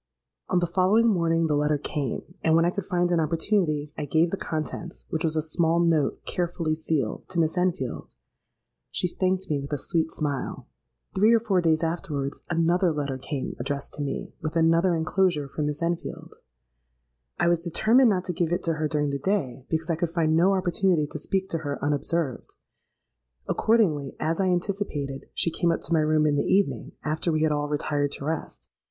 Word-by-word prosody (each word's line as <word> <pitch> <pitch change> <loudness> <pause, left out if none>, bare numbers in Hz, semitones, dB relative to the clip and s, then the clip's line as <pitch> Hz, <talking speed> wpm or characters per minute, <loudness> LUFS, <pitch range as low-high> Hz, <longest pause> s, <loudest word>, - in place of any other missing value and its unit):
"On 185 - +2
the 175 - +3
following 190 +6 +3
morning 165 -4 +2
the 150 -2 +1
letter 150 0 +2
came: 145 +3 -4
and 160 0 +4
when 165 0 +4
I 175 - +2
could 200 0 -4
find 175 -2 +1
an 170 - +3
opportunity, 160 -2 0
I 150 - -3
gave 160 +4 +2
the - - 0
contents 165 0 -5
(which 160 - -1
was 160 -1 +1
a 155 - +1
small 165 +1 +1
note 165 -4 +1
carefully 170 -2 -1
sealed) 155 -7 -2
to 180 - -2
Miss 160 +1 +1
Enfield. 180 - -2 0.7
She - - 0
thanked 185 +1 -1
me 145 -2 0
with 140 - -8
a 145 - 0
sweet 160 +3 0
smile. 145 -5 -3 0.5
Three 215 +4 +5
or - - +4
four 200 -5 +1
days 160 -1 +2
afterwards, 150 -4 -3
another 170 +2 +2
letter 140 -3 -3
came 140 0 -4
addressed 140 +2 -3
to 145 - -6
me, 140 -1 -4
with 155 +1 -4
another 165 +2 +3
enclosure 160 -2 +1
for 145 - -5
Miss 150 +2 -2
Enfield. 170 0 -3 1.0
I - - +2
was 170 -1 +3
determined 225 +9 +4
not 185 -3 0
to 180 - -2
give 170 0 -1
it 175 +1 0
to 165 - +1
her 155 0 -1
during 150 -1 0
the 140 - -2
day, 135 -8 -2
because 160 +1 -1
I - - +1
could 165 +1 -1
find 165 -2 +1
no 180 +4 +4
opportunity 180 -3 +2
to 150 - -7
speak 190 +4 -1
to 165 - -1
her 145 -2 -3
unobserved. 145 -1 -1 0.9
Accordingly, 170 - +2
as 165 +4 0
I 190 - +2
anticipated, 175 -7 -2
she 170 - +1
came 170 +1 +1
up 165 - -1
to - - -3
my 160 - +4
room 155 0 +3
in 145 -1 +2
the - - +2
evening, 200 +1 +1
after 155 +2 -1
we 155 0 +1
had 155 - +3
all 145 0 -1
retired 145 -1 0
to 140 - -6
rest. 160 +1 -4
165 Hz, 195 wpm, -26 LUFS, 150-175 Hz, 1.0 s, Three